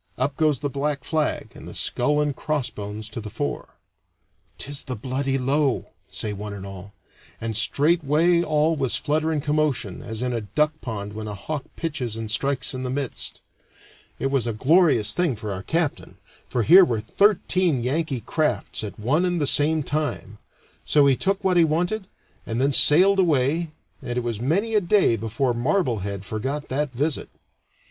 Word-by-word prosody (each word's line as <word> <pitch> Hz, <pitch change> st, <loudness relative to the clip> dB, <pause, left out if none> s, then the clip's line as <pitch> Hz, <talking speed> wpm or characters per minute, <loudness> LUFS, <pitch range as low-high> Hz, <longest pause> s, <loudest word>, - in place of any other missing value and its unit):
Up 135 Hz, +2 st, -1 dB
goes 150 Hz, -4 st, +1 dB
the 145 Hz, -, 0 dB
black 140 Hz, +1 st, -2 dB
flag, 155 Hz, -2 st, -1 dB
and -, -, -11 dB
the -, -, -9 dB
skull 145 Hz, +4 st, +1 dB
and 145 Hz, -2 st, -1 dB
crossbones 110 Hz, -9 st, -3 dB
to 110 Hz, +2 st, -6 dB
the 105 Hz, -, -7 dB
fore. -, -, -4 dB, 0.8 s
"'Tis 140 Hz, +1 st, -4 dB
the 130 Hz, -, -4 dB
bloody 135 Hz, +4 st, -1 dB
Low," 135 Hz, +1 st, 0 dB, 0.2 s
say 105 Hz, -, -4 dB
one 105 Hz, +1 st, -6 dB
and 100 Hz, -1 st, -8 dB
all; 100 Hz, 0 st, -10 dB, 0.4 s
and 115 Hz, -1 st, -3 dB
straightway 160 Hz, +7 st, +3 dB
all 155 Hz, 0 st, +2 dB
was 135 Hz, -5 st, 0 dB
flutter 155 Hz, +2 st, 0 dB
and 150 Hz, -3 st, -1 dB
commotion, 145 Hz, -9 st, 0 dB
as 110 Hz, +2 st, -5 dB
in 125 Hz, -1 st, -1 dB
a 115 Hz, -, -2 dB
duck 150 Hz, +9 st, 0 dB
pond 105 Hz, -4 st, -5 dB
when 110 Hz, 0 st, -6 dB
a 105 Hz, -, -5 dB
hawk 145 Hz, +8 st, -5 dB
pitches 135 Hz, -9 st, -3 dB
and 110 Hz, -1 st, -4 dB
strikes 130 Hz, +3 st, +1 dB
in 130 Hz, -, -4 dB
the 130 Hz, -, -3 dB
midst. 135 Hz, -1 st, -3 dB, 0.8 s
It 135 Hz, -, -2 dB
was 135 Hz, -4 st, +1 dB
a 115 Hz, -, -1 dB
glorious 140 Hz, -, +3 dB
thing 175 Hz, -8 st, +1 dB
for 105 Hz, -1 st, -5 dB
our 95 Hz, -, -5 dB
captain, 160 Hz, -, -2 dB, 0.3 s
for 120 Hz, -, 0 dB
here 185 Hz, -, +8 dB
were 120 Hz, -10 st, 0 dB
thirteen 180 Hz, -, +2 dB
Yankee 135 Hz, -1 st, -1 dB
crafts 150 Hz, 0 st, -1 dB
at 105 Hz, -, -6 dB
one 140 Hz, +11 st, +1 dB
and 175 Hz, -1 st, 0 dB
the 145 Hz, -, +1 dB
same 150 Hz, +2 st, +2 dB
time. 145 Hz, -8 st, -3 dB, 0.4 s
So 145 Hz, -2 st, +4 dB
he 135 Hz, -1 st, +5 dB
took 195 Hz, +7 st, -1 dB
what 185 Hz, -2 st, +2 dB
he 170 Hz, -, +6 dB
wanted, 175 Hz, +6 st, 0 dB, 0.4 s
and 115 Hz, +1 st, -2 dB
then 135 Hz, +2 st, +2 dB
sailed 185 Hz, +9 st, +6 dB
away, 160 Hz, -1 st, +2 dB, 0.3 s
and 120 Hz, -2 st, -4 dB
it 125 Hz, -, 0 dB
was 115 Hz, -2 st, -3 dB
many 195 Hz, -, 0 dB
a 210 Hz, -, +4 dB
day 185 Hz, -, +3 dB
before 115 Hz, +4 st, -1 dB
Marblehead 115 Hz, -, -1 dB
forgot 135 Hz, +8 st, -4 dB
that 145 Hz, +1 st, -1 dB
visit. 145 Hz, +4 st, -1 dB
140 Hz, 180 wpm, -24 LUFS, 115-155 Hz, 0.8 s, here